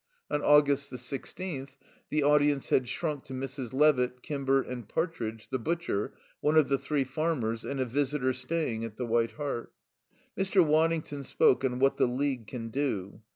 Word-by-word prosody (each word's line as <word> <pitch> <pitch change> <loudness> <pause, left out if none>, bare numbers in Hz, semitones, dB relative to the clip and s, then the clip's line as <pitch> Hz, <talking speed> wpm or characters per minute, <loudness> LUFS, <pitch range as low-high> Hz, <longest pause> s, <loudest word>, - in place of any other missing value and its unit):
On 145 - +1
August 145 -1 +4
the 125 - -6
sixteenth, 135 +2 -5 0.3
the 150 -1 +1
audience 145 -1 +3
had 130 - +3
shrunk 150 -1 -3
to 130 - -8
Mrs. 130 -2 -5
Levitt, 125 -3 +3
Kimber 135 -2 +1
and 120 -4 -7
Partridge, 115 -10 -3
the 130 - -1
butcher, 165 -7 -2 0.2
one 150 +1 +2
of 155 -3 +5
the 135 -1 +2
three 140 +1 0
farmers, 130 -5 -1
and 140 - -4
a 130 - +1
visitor 130 +1 0
staying 130 -3 -2
at 110 -2 -6
the 125 - -2
White 115 0 +1
Hart. 145 -5 -4 0.6
Mr. 190 -2 +3
Waddington 155 -1 +1
spoke 130 -1 +3
on 125 -2 0
"What 135 +1 +3
the - - +4
League 130 -2 -1
Can 115 +1 -5
Do." 110 -7 -2
135 Hz, 170 wpm, -29 LUFS, 125-150 Hz, 0.6 s, of